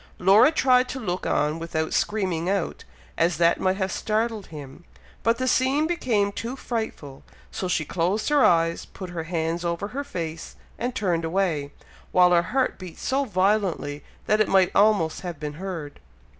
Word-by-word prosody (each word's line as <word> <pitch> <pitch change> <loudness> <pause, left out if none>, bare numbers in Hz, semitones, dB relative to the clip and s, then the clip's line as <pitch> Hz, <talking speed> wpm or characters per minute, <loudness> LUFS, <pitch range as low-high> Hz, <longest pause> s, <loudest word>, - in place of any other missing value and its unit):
Laura 205 - +6
tried 255 -5 +3
to 265 - -4
look 185 -6 -3
on 150 +2 0
without 160 -1 -3
screaming 185 -5 0
out, 195 -3 -2 0.4
as 170 0 +2
that 170 0 +3
might 185 0 +1
have 190 -1 -1
startled 220 -1 -1
him, 145 0 -10 0.4
but 230 0 +2
the 255 - -1
scene 265 +4 +2
became 235 -12 0
too 230 +5 -5
frightful, 220 - -5 0.3
so 185 - -3
she 170 -3 0
closed 185 - -1
her 295 -2 +4
eyes, 165 -1 +3
put 185 -2 -9
her 165 -2 -5
hands 165 0 -2
over 170 +4 -2
her 275 +5 -4
face 165 - -6 0.2
and 245 +1 -2
turned 175 -7 0
away, 165 -5 -1 0.4
while 180 -1 +5
her 175 -1 +5
heart 260 -1 0
beat 180 -3 -9
so 275 +1 0
violently, 185 - 0 0.2
that 215 0 +2
it 215 - +2
might 190 -2 +4
almost 200 -6 +3
have 175 -5 -6
been 150 -1 -5
heard. 170 -7 -6
185 Hz, 170 wpm, -24 LUFS, 165-220 Hz, 0.4 s, Laura